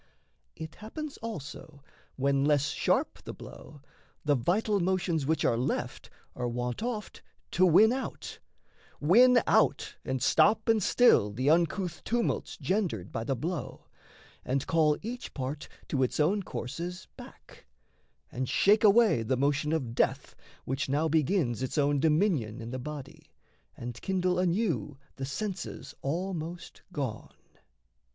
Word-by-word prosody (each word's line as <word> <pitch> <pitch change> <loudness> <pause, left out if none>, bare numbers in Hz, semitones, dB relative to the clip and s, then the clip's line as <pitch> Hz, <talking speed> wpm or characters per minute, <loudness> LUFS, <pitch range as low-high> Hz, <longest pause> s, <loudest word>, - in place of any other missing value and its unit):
It 160 0 -7
happens 290 +7 -7
also, 155 -8 -8 0.3
when 140 0 +1
less 145 0 +2
sharp - - 0
the - - -8
blow, 145 -3 -12 0.4
The 150 - +4
vital 200 - +1
motions 175 -5 0
which 160 0 +1
are - - +3
left 125 - -3 0.3
are 125 - -2
wont 120 - -3
Oft 225 -3 -4 0.3
to 185 +1 +4
win 210 +7 +6
out 265 0 -5 0.6
win 240 +10 +6
out, - - +2
and 130 0 -2
stop 215 - +3
and 225 -2 +3
still 200 - +4
The 130 +7 +1
uncouth 170 +1 0
tumults 235 0 -1
gendered 175 - -1
by 115 - -3
the 135 +3 -1
blow, 165 +6 -5 0.6
And 135 +1 -1
call 155 -2 +3
each 245 +3 -6
part 140 +2 -4 0.2
to 135 - 0
its 130 - 0
own 185 +8 +2
courses 175 +4 -6
back, - - -14 0.6
And 130 0 -3
shake 210 +3 +4
away 215 - +5
the 120 +3 0
motion 145 +3 +1
of 135 -8 -1
death 135 +3 0 0.3
which 135 +2 -2
now 150 +4 +1
Begins 150 - +1
its 130 +4 -3
own 145 -1 +2
dominion 150 - +1
in 115 0 -7
the 130 - -4
body, 140 0 -8 0.5
And 120 0 -7
kindle 185 -1 0
anew 180 -5 0 0.2
the 135 - -3
senses 185 +6 -5
almost 170 +2 -4
gone. 135 -9 -5
155 Hz, 140 wpm, -29 LUFS, 135-190 Hz, 0.6 s, win